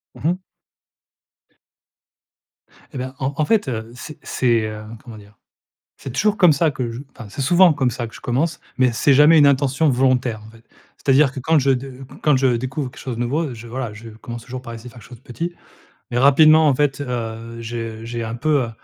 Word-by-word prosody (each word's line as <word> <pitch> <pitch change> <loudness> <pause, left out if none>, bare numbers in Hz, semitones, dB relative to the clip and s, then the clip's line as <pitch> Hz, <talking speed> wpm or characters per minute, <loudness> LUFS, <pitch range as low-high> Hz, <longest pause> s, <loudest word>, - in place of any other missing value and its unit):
Mmh 155 - -3
mh. 180 - 0 2.6
Eh - - -6
ben, 130 +1 -5
en 135 +1 -2
en 155 - +1
fait, 220 -5 +1
heu, 115 -2 -4
c'est 150 +4 -9
c'est, 120 -3 +1
heu, 105 0 -7 0.2
comment 115 -4 -11
dire? 105 -1 -17 0.6
C'est 135 - -8
toujours 210 +8 +1
comme 180 -5 +6
ça 155 +1 +1
que 125 -3 -4
je 120 +3 -7
enfin, 115 - -11
c'est 125 - -5
souvent 175 +5 +5
comme 135 -4 0
ça 120 -1 -4
que - - -14
je - - -12
commence, 150 +7 -1 0.2
mais 130 -1 +3
c'est 140 +4 +3
jamais 150 +4 +6
une 145 - +7
intention 140 +2 +2
volontaire 125 -3 +1
en - - -13
fait. 115 0 -19 0.3
C'est-à-dire 135 0 +3
que 135 - -7
quand 155 +3 +2
je 135 0 +2
de 130 +1 -3 0.3
quand 150 -3 +3
je 130 -2 +2
découvre 130 +2 -3
quelque - - -14
chose 125 -3 -5
de 120 - -4
nouveau, 140 +3 -1
je, 115 0 -10
voilà, 120 -2 -5
je 115 +2 -11
commence 115 +2 -9
toujours 130 0 -7
par 120 -2 -9
essayer 115 +2 -9
faire 120 - -14
quelque - - -16
chose 125 - -11
de 120 - -28
petit. 170 +8 -5 0.6
Mais 120 - -1
rapidement, 155 +3 +6
en 140 - +3
fait, 145 0 0
heu, 115 -2 -5
j'ai 115 -1 -6
j'ai 115 0 -4
un 115 +1 -4
peu, 145 +1 +1
heu, 115 - -5
130 Hz, 220 wpm, -20 LUFS, 115-145 Hz, 2.6 s, une